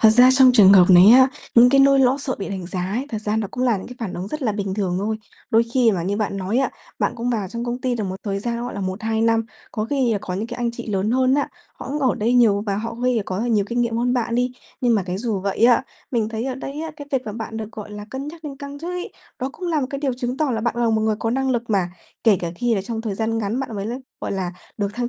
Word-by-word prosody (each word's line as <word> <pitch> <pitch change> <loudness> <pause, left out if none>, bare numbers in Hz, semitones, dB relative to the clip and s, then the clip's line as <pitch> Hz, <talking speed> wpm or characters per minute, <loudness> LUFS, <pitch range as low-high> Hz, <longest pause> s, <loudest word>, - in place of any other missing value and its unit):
Thật 220 - +7
ra 245 +3 +7
trong 260 -1 +6
trường 205 -5 +8
hợp 185 -3 +8
này 180 +3 +9
á, 260 +2 +8 0.3
những 240 +1 +8
cái 275 +1 +5
nỗi 275 0 +6
lo 260 0 +4
sợ 275 -2 -3
bị 195 - -4
đánh 190 -3 -5
giá 185 0 -4
ấy, 235 +9 -2
thật 220 - -3
ra 215 0 -1
nó 220 -2 0
cũng 255 - -2
là 240 -4 +3
những 190 - -7
cái 250 - -9
phản 210 -6 -4
ứng 185 +3 -5
rất 305 -1 -5
là 225 -5 +1
bình 200 -2 -3
thường 190 -3 -1
thôi. 215 +3 -1 0.3
Đôi 225 +1 +5
khi 245 -3 +5
mà 180 -3 -1
như 195 +4 -1
bạn 210 -2 -2
nói 195 +5 -1
á, 270 - +1 0.3
bạn - - +1
cũng 240 +1 -2
vào 210 -5 -1
trong 235 +5 -5
công 245 +1 -3
ty 255 -1 0
được 220 -3 -2
một 190 -1 -4
thời 200 -2 -1
gian, 235 +3 -3
gọi 245 - -5
là, 200 - -4
1-2 215 +4 -2
năm, 225 0 +2 0.3
có 215 -1 -2
khi 255 -3 +1
có 180 - -5
những 210 +4 -3
cái 240 - -7
anh 240 -1 -1
chị 235 0 -8
lớn 205 0 0
hơn 260 +2 +3
á, 285 - +1 0.3
họ - - -9
cũng 290 +2 -2
ở 265 -4 +2
đây 225 +3 0
nhiều 215 -5 +4
và 200 -1 0
họ 230 +2 -4
ngây 250 +2 0
là 220 - +1
có 185 - -3
là 230 - -1
nhiều 210 -4 +2
kinh 240 0 0
nghiệm 235 -1 0
hơn 245 +1 +1
bạn 235 -1 -1
đi. 250 +1 +1 0.3
Nhưng 245 -2 +3
mà 205 - +2
cái 180 +1 -3
dù 215 -3 -2
vậy 200 +3 0
á, 240 0 +5 0.3
mình 230 -4 0
thấy 225 +1 -4
ở 265 -1 -2
đây 275 +3 -6
á, 325 - -4
cái 285 -2 -9
việc 260 -3 -1
là 210 - -4
bạn 225 0 -6
được, 220 0 -6
gọi 210 -1 -8
là, 205 0 -7
cân 270 +3 -5
nhắc 325 +1 -11
lên 280 -2 -6
căng 280 0 -8
chức 335 +4 -5
ấy, 360 0 -5 0.3
đó 260 - -2
cũng 360 +3 -5
là 320 -3 +1
một 260 - -1
cái 275 - -3
điều 275 -2 -1
chứng 250 0 -3
tỏ 300 -1 0
là 225 -3 -1
bạn 235 +1 -1
là 240 -1 +2
một 220 -1 +2
người 220 -1 +1
có 225 - -1
năng 265 +2 0
lực 240 -2 -2
mà. 190 -4 +1 0.3
Kể 220 -4 +6
cả 170 - -3
khi 240 -1 +1
là 195 - -1
trong 225 +2 -4
thời 220 -3 -3
gian 225 +2 -1
ngắn 220 +4 -1
bạn 260 -4 -5
mới 200 0 -3
l 230 - -3 0.3
gọi - - -3
là, 185 -2 -2 0.2
được 205 -2 -1
thăng 240 0 -2
230 Hz, 320 wpm, -22 LUFS, 205-255 Hz, 0.3 s, này